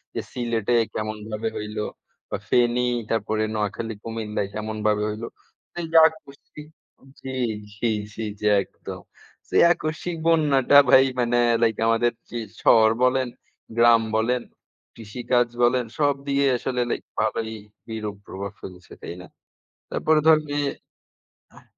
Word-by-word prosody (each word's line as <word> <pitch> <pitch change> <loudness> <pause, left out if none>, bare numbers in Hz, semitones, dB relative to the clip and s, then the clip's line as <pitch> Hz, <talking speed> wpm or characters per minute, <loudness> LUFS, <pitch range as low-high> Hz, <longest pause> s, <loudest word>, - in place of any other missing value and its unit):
যে - - -1
সিলেটে 120 -1 0 0.2
কেমনভাবে 110 +1 -3
হইল 105 0 -6 0.5
বা - - -1
ফেনী 125 0 +3 0.2
তারপরে 110 -1 0
নোয়াখালী 105 +1 -3
কুমিল্লায় 110 -3 -3
কেমনভাবে 105 -1 -1
হইল? 110 +2 -6 0.6
এইযে 165 -1 +1
আকস্মিক 150 -1 -12 0.5
জি, 130 - -6 0.4
জি, 115 +2 -1 0.2
জি, 110 - -5 0.2
জি 105 - -5 0.2
একদম। - - -10 0.5
সেই - - +5
আকস্মিক 160 +2 -4
বন্যাটা 145 -5 +4
ভাই 135 0 +8
মানে 120 0 +2 0.2
লাইক 115 -2 +2
আমাদের 115 +1 +3 0.2
যে 120 - -4 0.3
শহর 110 -1 +6
বলেন, 130 0 +2 0.5
গ্রাম 115 -1 +6 0.2
বলেন, 125 +3 +1 0.5
কৃষিকাজ 120 +2 0 0.2
বলেন 120 0 +3
সব 145 -2 +3
দিয়ে 140 0 +2
আসলে 125 0 -2
লাইক - - -3 0.2
ভালোই 110 0 -1 0.4
বিরূপ 110 -2 -4
প্রভাব 100 +1 -6
ফেলছে, 90 -1 -11
তাই 85 - -7
না? 90 - -12 0.6
তারপরে 155 0 +2
ধরন 155 -1 +6
যে 145 - -1 1.0
আহ - - -17
115 Hz, 125 wpm, -24 LUFS, 110-130 Hz, 1.0 s, ভাই